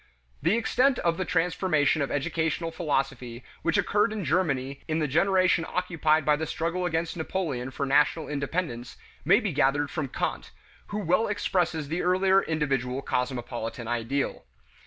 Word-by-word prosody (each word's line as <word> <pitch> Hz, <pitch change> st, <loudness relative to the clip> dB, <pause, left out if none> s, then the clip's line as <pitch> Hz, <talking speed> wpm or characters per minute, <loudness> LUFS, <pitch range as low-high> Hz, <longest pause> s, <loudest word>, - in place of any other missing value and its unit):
The 170 Hz, +9 st, +2 dB
extent 250 Hz, +3 st, +2 dB
of 170 Hz, -1 st, 0 dB
the 185 Hz, -, -2 dB
transformation 165 Hz, -4 st, +1 dB
of 140 Hz, -, -1 dB
educational 160 Hz, +3 st, -1 dB
philosophy 135 Hz, -7 st, -2 dB, 0.2 s
which -, -, +1 dB
occurred 210 Hz, +3 st, +2 dB
in 210 Hz, -4 st, -4 dB
Germany 140 Hz, -6 st, 0 dB
in 155 Hz, -1 st, 0 dB
the 155 Hz, -2 st, 0 dB
generation 185 Hz, +3 st, +3 dB
occupied 160 Hz, -4 st, +1 dB
by 150 Hz, -, +4 dB
the 160 Hz, +1 st, -3 dB
struggle 170 Hz, +4 st, -1 dB
against 165 Hz, +1 st, -2 dB
Napoleon 160 Hz, -7 st, -3 dB
for 140 Hz, +1 st, -3 dB
national 150 Hz, +3 st, +2 dB
independence, 140 Hz, -4 st, -3 dB, 0.3 s
may 195 Hz, -, +5 dB
be 215 Hz, -6 st, -2 dB
gathered 145 Hz, +1 st, +2 dB
from 155 Hz, -4 st, -2 dB
Kant, -, -, -3 dB, 0.4 s
who 205 Hz, -, -4 dB
well 190 Hz, +2 st, +2 dB
expresses 175 Hz, -6 st, 0 dB
the 165 Hz, +4 st, -2 dB
earlier 190 Hz, +2 st, +3 dB
individual 135 Hz, -5 st, -1 dB
cosmopolitan 120 Hz, -3 st, -3 dB
ideal. 120 Hz, +4 st, -2 dB
160 Hz, 150 wpm, -27 LUFS, 140-180 Hz, 0.4 s, may